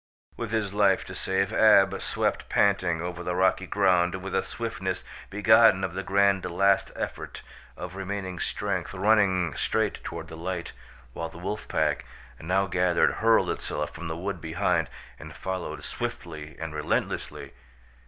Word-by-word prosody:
With 115 - -4
his 110 -3 -1
life 100 -2 +3
to - - -8
save, 95 +2 -1
Ab 100 -4 +5
swept - - -1
panting 90 -4 +2
over 90 0 -5
the 90 0 -2
rocky 95 +1 +2
ground 90 -3 +3
with 95 - -5
a - - +2
swiftness - - -4 0.3
begotten 105 -1 +5
of 95 -3 -2
the 95 - -3
grand 100 0 +2
last 95 +2 +2
effort - - -5 0.3
of 90 +1 -7
remaining 95 -2 -4
strength, 100 -2 -2
running 95 -4 +3
straight - - -1
toward - - -6
the 80 - -9
light, 85 +1 -4 0.4
while 80 +4 -4
the - - -12
wolf 100 +4 -4
pack, - - 0 0.4
now 95 +4 +1
gathered, 90 -1 +2
hurled 115 0 +4
itself 75 0 -3
from 85 0 -6
the 80 0 -4
wood 100 +3 -4
behind 80 -1 0 0.3
and 80 0 -10
followed 95 -1 -4
swiftly 75 0 -5
and 80 -1 -5
relentlessly. 75 0 -2
95 Hz, 155 wpm, -27 LUFS, 85-100 Hz, 0.4 s, Ab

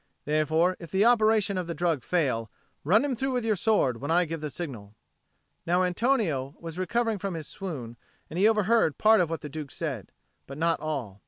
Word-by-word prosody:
Therefore, 160 +4 +2
if 170 - -10
the 190 +6 +2
operation 215 -4 +3
of 180 - -4
the 170 - -4
drug 165 -4 0
fail, 125 -9 0 0.3
run 210 - +4
him 275 -3 -1
through 265 +3 -2
with 245 -2 -1
your 220 -2 +2
sword 185 - +1
when 145 - -4
I 175 +2 +3
give 165 -1 -5
the 150 - -3
signal." 120 - -7 0.7
Now 180 +2 +2
Antonio 180 - 0
was 165 +1 -7
recovering 225 +2 0
from 195 -2 -3
his 155 -3 -6
swoon, 130 -12 -7 0.3
and 170 - -5
he 205 - +6
overheard 220 -5 +2
part 220 -1 +5
of 170 - 0
what 165 -1 -4
the - - -6
Duke 150 0 -6
said, 135 - -5 0.4
but 140 - -8
not 165 +1 +1
all. 130 -11 -4
170 Hz, 200 wpm, -27 LUFS, 150-210 Hz, 0.7 s, he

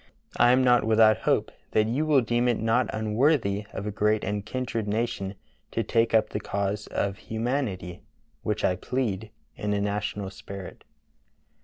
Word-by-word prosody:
I 120 - +6
am 130 +1 +4
not 125 -1 +5
without 110 -1 +5
hope - - +2 0.2
that 110 - +4
you 140 +7 0
will 145 -4 +5
deem 120 +1 +1
it 120 -2 +2
not 115 +3 +2
unworthy 110 -2 +1
of 100 - -5
a 105 - -2
great 105 +1 +1
and 105 0 -2
kindred 115 -1 -3
nation 105 -2 -2 0.3
to - - -1
take 115 0 +2
up 110 - +3
the 105 - -3
cause 100 0 -2
of 100 -1 -2
humanity, 110 -7 -3 0.4
which 105 0 -1
I 90 - +1
plead, 110 -2 -2 0.3
in 105 0 -2
a - - 0
national 100 -1 -2
spirit." 100 -1 -9
110 Hz, 165 wpm, -27 LUFS, 100-120 Hz, 0.4 s, I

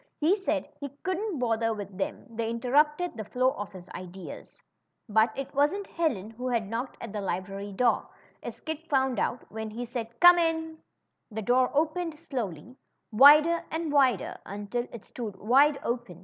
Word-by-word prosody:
He 320 +6 +4
said 390 -2 -2
he 285 - -5
couldn't 375 0 -2
bother 225 -2 0
with 200 -2 -7
them; 190 - -4
they 230 -1 -3
interrupted 295 +8 +1
the 220 - -5
flow 255 +5 +1
of 205 -4 -6
his 185 -2 -11
ideas. 185 +1 -9 0.5
But 220 +1 +3
it 275 - -5
wasn't 295 +9 +1
Helen 240 - -2
who 250 +3 -5
had 235 -4 0
knocked 235 +5 -4
at 225 -3 -7
the 210 - -3
library 195 +2 -4
door, 240 +5 +1 0.3
as - - -7
Kit 315 0 -6
found 265 -3 +2
out 240 - -1
when 220 0 -5
he 235 +3 -5
said, 235 -1 -6
Come 350 0 +8
in! 320 -1 -1 0.3
" - - -52
The 220 -1 -5
door 250 +4 +3
opened 320 +1 0
slowly, 240 - -5 0.3
wider 300 +8 +7
and 320 -1 -2
wider, 260 -9 +2
until 205 +5 -4
it 235 - -10
stood 220 -5 -6
wide 275 +9 +4
open. 235 -8 -3
245 Hz, 175 wpm, -28 LUFS, 215-300 Hz, 0.5 s, Come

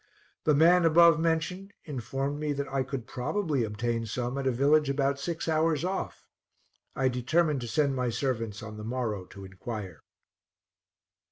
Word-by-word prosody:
The 150 - +4
man 170 +4 +6
above 165 0 +6
mentioned 170 +4 -1
informed 135 +1 -3
me 150 -1 -1
that 140 0 -3
I 135 - +1
could 130 -2 -4
probably 145 - -1
obtain 115 +2 -2
some 120 +3 -3
at 135 - -1
a - - +3
village 145 +4 +3
about 140 0 0
six 165 +3 -4
hours 160 0 +1
off. 190 +1 -4 0.7
I 135 - +2
determined 140 +4 +1
to 120 - -5
send 140 +1 +1
my 125 -1 0
servants 115 -4 -2
on 110 -1 -8
the 105 - -7
morrow 110 -5 -3
to 100 +1 -11
inquire. 95 -2 -7
135 Hz, 160 wpm, -28 LUFS, 120-155 Hz, 0.7 s, man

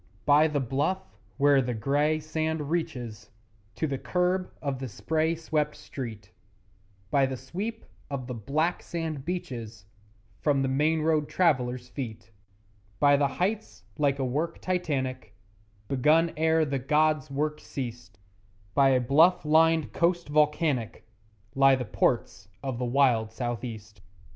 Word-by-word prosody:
By 145 +3 +6
the 150 -2 -1
bluff 145 +9 -2 0.2
where 140 -1 +5
the 125 -1 -2
grey 145 +7 +1
sand 155 -1 -2
reaches 120 - -3 0.5
To 120 - -1
the 140 -3 -2
kerb 180 +1 0
of 140 -3 -3
the 130 - -4
spray 160 - 0
swept 155 -2 -1
street, 110 -7 -8 0.8
By 140 -2 +3
the 130 0 -4
sweep 200 - -5 0.2
of 135 -3 -4
the 125 - -5
black 150 - -1
sand 160 -5 -4
beaches 120 - -5 0.5
From 140 -3 +2
the - - +1
main 150 +4 +1
road 155 -2 +1
travellers' 125 -8 +1
feet, 120 -4 -7 0.7
By 145 0 +6
the 140 0 +3
heights 180 - -2 0.2
like 140 -2 +2
a 135 - -1
work 155 +7 -2
Titanic, 130 - -2 0.5
Begun 155 +5 +3
ere 160 0 +3
the 140 -2 -2
gods' 150 +2 +2
work 150 +2 -2
ceased, 120 -7 -7 0.6
By 135 -1 +5
a 130 -1 +4
bluff 160 +8 +4
lined 160 0 +3
coast 170 -1 +1
volcanic 150 -5 +1 0.5
Lie 135 0 +5
the 125 -1 -3
Ports 100 -2 0 0.2
of 130 -3 -3
the 125 - -1
wild 120 -4 +2
South 120 0 -4
east. 110 -3 -8
140 Hz, 140 wpm, -27 LUFS, 125-160 Hz, 0.8 s, By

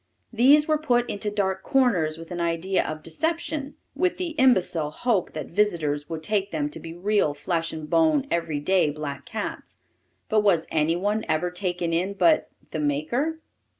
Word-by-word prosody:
These 280 +6 +5
were 310 -1 +2
put 245 -5 +1
into 205 +1 -3
dark 195 -2 -1
corners 195 - +2
with 165 +2 -11
an 175 -1 -3
idea 170 +3 0
of 155 0 -6
deception, 300 - -2 0.2
with 360 +4 +1
the 360 -2 -2
imbecile 185 - +2
hope 205 +3 -1
that 155 -2 -6
visitors 165 -7 0
would 160 -1 -5
take 205 0 0
them 150 -4 -2
to - - -8
be 165 - -8
real 185 -5 +1
flesh 165 -1 -2
and 155 -1 -6
bone 310 - +3
everyday 165 +1 +1
black 145 -2 -6
cats. 220 -3 -5 0.5
But 215 -1 +3
was 185 -6 +3
any 155 +1 +2
one 205 +4 0
ever 160 +3 0
taken 180 -2 -2
in 185 +4 0
but 310 +9 +3 0.2
the 155 - -3
maker? 235 - -1
185 Hz, 170 wpm, -25 LUFS, 160-240 Hz, 0.5 s, These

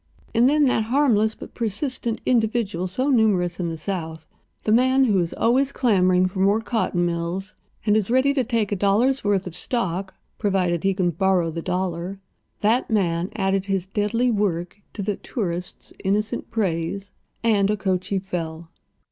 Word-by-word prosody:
And 240 +3 +5
then 295 0 +4
that 225 -4 +2
harmless, 225 -4 +2
but - - -11
persistent, 235 +1 -3
individual 220 -6 +1
so 255 +10 -1
numerous 190 -8 +2
in 175 -2 -1
the 165 - -5
South—the 160 +3 -6
man 260 +4 +4
who 210 -7 +3
is 170 -2 -1
always 260 +4 +2
clamoring 185 -8 +3
for 190 +1 -6
more 200 +3 +3
cotton 220 -6 0
mills, 175 +4 -3 0.3
and 210 -1 +3
is 215 -2 +1
ready 260 +3 +3
to 270 -2 +1
take 230 -3 -1
a - - +1
dollar's 215 +8 +2
worth 200 -2 +1
of 180 - -6
stock, 190 -1 -3 0.2
provided 185 -5 +1
he 195 -1 +2
can 180 -2 +1
borrow 180 0 +1
the 165 +1 -4
dollar—that 190 +6 -2
man 180 -4 +1
added 195 -1 0
his 195 -2 -1
deadly 210 +5 0
work 200 -2 -1
to 205 - -4
the 205 0 -2
tourist's 180 -6 -5
innocent 210 +4 -1
praise, 195 -2 -2 0.3
and 205 -3 +3
Okochee 195 -2 0
fell. 165 -3 -5
200 Hz, 155 wpm, -23 LUFS, 180-225 Hz, 0.3 s, And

